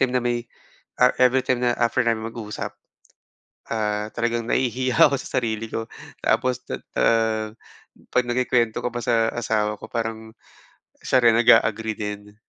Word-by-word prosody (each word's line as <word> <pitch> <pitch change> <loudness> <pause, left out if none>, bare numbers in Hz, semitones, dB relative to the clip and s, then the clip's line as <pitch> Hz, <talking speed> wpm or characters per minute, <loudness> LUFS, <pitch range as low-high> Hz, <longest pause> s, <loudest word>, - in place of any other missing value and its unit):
everytime 130 - +2
na 125 - +1
may, 120 -1 -1 0.6
ah, 125 - +7
everytime 130 0 +3
na 120 - +3
after 120 0 +1
namin 115 -1 0
mag-usap, 110 -2 -6 0.9
ah, 105 -1 -1
talagang 120 0 -1
nahihiya 130 0 0
ako - - 0
sa - - -2
sarili 115 -2 -3
ko. 115 0 -3 0.4
Tapos, 125 -1 +2
tat - - -5 0.2
ah, 110 -1 +1 0.6
'pag 125 - +1
nakukwento 120 -2 +1
ko 125 - -1
pa 120 - -5
sa 115 -1 +2
asawa 105 -2 -1
ko, - - -9
parang 110 -1 -5 0.7
siya 130 - +3
rin 115 -1 +6
nag-a-agree 110 -2 +4
din. 105 0 -6
115 Hz, 150 wpm, -23 LUFS, 110-120 Hz, 0.9 s, ah